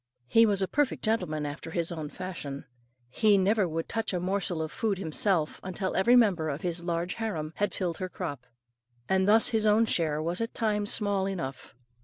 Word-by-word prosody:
He 225 - +5
was 200 -2 +2
a - - 0
perfect 290 +3 0
gentleman 180 -9 0
after 145 +3 -6
his 170 0 -1
own 155 -3 -5
fashion. 155 -6 -6 0.5
He 210 +7 +4
never 195 +1 +2
would 165 0 -3
touch 225 -3 -2
a - - 0
morsel 185 -1 -1
of 155 - -5
food 215 -4 -1
himself, 170 -1 0
until 185 +1 -3
every 235 +6 +5
member 190 -10 +3
of 145 +2 -4
his 175 -1 -2
large 170 +1 -2
harem 165 -8 -3
had 205 - 0
filled 180 -2 -3
her 185 -1 -3
crop; 145 -10 -6 0.6
and 190 0 +2
thus 220 +2 +5
his 220 -2 +1
own 215 +2 +5
share 160 -8 +1
was 170 +5 -2
at 230 - -3
times 210 -2 0
small 200 -3 0
enough. 135 -12 -5
185 Hz, 195 wpm, -28 LUFS, 165-210 Hz, 0.6 s, He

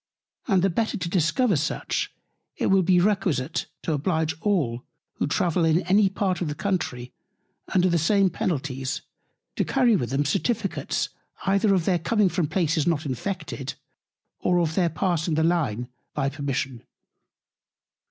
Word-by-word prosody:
And 190 -6 +3
the 195 - +3
better 220 +5 0
to 180 - -3
discover 190 - +2
such, 150 +2 -1 0.5
it - - +1
will 195 0 +5
be 180 0 +4
requisite 175 -7 0 0.2
to 160 - 0
oblige 160 +1 0
all, 145 - 0 0.3
who - - 0
travel 170 +3 +1
in 165 +2 +3
any 195 +2 +4
Part 190 -2 -1
of 175 - 0
the 150 - -3
Country, 155 -9 -2 0.6
under 185 0 +5
the 170 -2 +2
same 195 +3 +3
Penalties, 135 -6 -2 0.5
to - - +2
carry 250 -4 +3
with 125 -11 -1
them 140 +3 0
Certificates 200 - -1 0.4
either 195 +1 +3
of 175 -3 0
their 180 -3 +2
coming 210 +3 +2
from 175 -2 0
Places 160 -2 +1
not 160 -2 +1
Infected, 135 -2 -4 0.6
or 180 0 +2
of 165 -2 +1
their 175 0 +2
passing 165 -1 0
the 160 - +2
Line 145 -9 0 0.3
by 135 - +1
permission. 135 -4 -3
170 Hz, 150 wpm, -25 LUFS, 145-190 Hz, 0.6 s, will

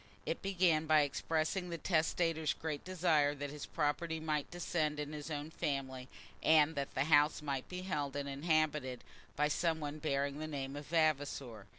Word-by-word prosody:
It - - -2
began 175 -5 +2
by 155 -1 +6
expressing 160 +5 -1
the 170 - -3
testator's 160 -1 +1
great 155 -3 -4
desire 165 -6 +2
that 145 0 -5
his 150 -1 -7
property 160 +1 -1
might 155 -2 -1
descend 160 -4 -1
in 150 0 -4
his 150 +1 -6
own 150 0 -4
family, 130 -4 -3 0.3
and 155 0 +5
that 140 -2 -4
the 130 - +2
house 150 0 +4
might 140 -3 -3
be 180 0 -5
held 145 -7 -2
and 140 0 -2
inhabited 150 -3 0 0.3
by 150 +1 +2
some 160 +2 +1
one 150 0 -5
bearing 140 -1 -1
the 155 - -4
name 140 -2 -4
of 145 0 -7
Vavasor. 145 - 0
150 Hz, 175 wpm, -35 LUFS, 145-160 Hz, 0.3 s, by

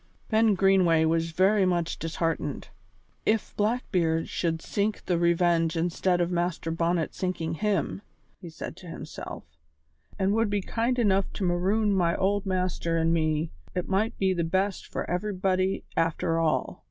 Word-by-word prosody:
Ben 220 -1 +4
Greenway 185 -4 +4
was 165 +1 +1
very 190 +5 +3
much 175 -3 0
disheartened. 165 -3 -2 0.5
"If 215 0 0
Blackbeard 185 -7 0
should 165 -2 -1
sink 205 +5 -2
the 175 -2 +1
Revenge 170 -1 +2
instead 175 +2 +1
of 175 +1 0
Master 175 -1 -1
Bonnet 165 0 0
sinking 175 -3 -2
him," 200 +2 -1 0.4
he 175 - -9
said 160 - -7
to 180 - -12
himself, 165 - -8 0.7
"and 195 +1 +1
would 225 0 +2
be 205 -1 0
kind 235 +5 -1
enough 195 -5 +2
to 200 - -4
maroon 195 +4 +2
my 170 -3 +2
old 200 +1 0
master 180 -3 -1
an' 165 0 +2
me, 155 -1 0 0.2
it 180 - -2
might 200 +4 0
be 190 -1 +2
the 170 -2 -1
best 190 +3 -1
for - - -4
everybody 185 0 0
after 165 0 +1
all. 160 -2 0
180 Hz, 155 wpm, -27 LUFS, 165-195 Hz, 0.7 s, Ben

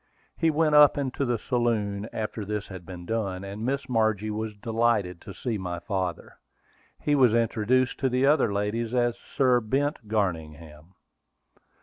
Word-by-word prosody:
We 165 - +4
went 155 0 +2
up 150 -1 +7
into 140 0 -1
the 120 -2 0
saloon 110 -3 -1
after 110 0 -4
this 105 +1 -4
had 95 -3 -9
been 90 -2 -8
done, 100 -3 -2
and 100 +2 -6
Miss 135 +3 -1
Margie 110 -3 +1
was 110 0 -4
delighted 110 -5 0
to 100 - -9
see 115 +1 -3
my 90 -2 -4
father. 90 0 -4 0.6
He 150 - 0
was 125 -5 +5
introduced 115 +2 +1
to 135 - +1
the 130 +2 +2
other 145 -6 +3
ladies 110 +4 -1
as 120 -1 +2
Sir 130 -3 +2
Bent 135 +1 -1
Garningham. 80 -5 -3
110 Hz, 155 wpm, -26 LUFS, 100-125 Hz, 0.6 s, up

